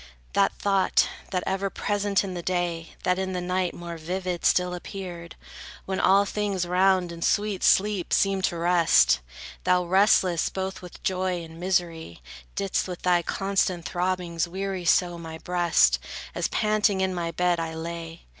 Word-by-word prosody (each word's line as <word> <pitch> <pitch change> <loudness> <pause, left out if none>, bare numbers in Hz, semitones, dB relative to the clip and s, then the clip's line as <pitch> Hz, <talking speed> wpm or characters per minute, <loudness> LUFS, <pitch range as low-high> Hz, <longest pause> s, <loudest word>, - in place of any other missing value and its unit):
That - - +3
thought, 195 -2 +2 0.2
that 180 -2 -1
ever 195 +1 -1
present 205 0 0
in 190 -2 -5
the 175 - -4
day, 170 -2 -2
That 180 +1 +1
in 190 0 -2
the 180 - -2
night 180 0 -1
more 170 -1 -7
vivid 180 +2 -4
still 180 0 +3
appeared, 175 -2 -7 0.5
When 190 0 -2
all 200 +1 +4
things 200 -3 -2
round 185 0 +2
in 170 0 -9
sweet 205 +1 0
sleep 200 -2 +2
seemed 195 -1 +2
to 170 - -2
rest: 170 - +4 0.4
Thou, 180 0 +3
restless, 185 -2 +3
both 190 0 -4
with 180 -1 -12
joy 185 -2 -1
and 165 0 -11
misery 170 - -2 0.3
Didst 195 -1 -1
with 180 -1 -7
thy 180 -1 +3
constant 190 -1 -1
throbbings 175 -2 -1
weary 190 0 -4
so 175 0 +2
My 160 -1 -7
breast, 165 - +2 0.3
as - - -1
panting 210 -2 +1
in 190 0 0
my 170 -2 -2
bed 175 +1 +1
I 165 -1 -4
lay. 165 0 -7
180 Hz, 160 wpm, -26 LUFS, 170-190 Hz, 0.5 s, all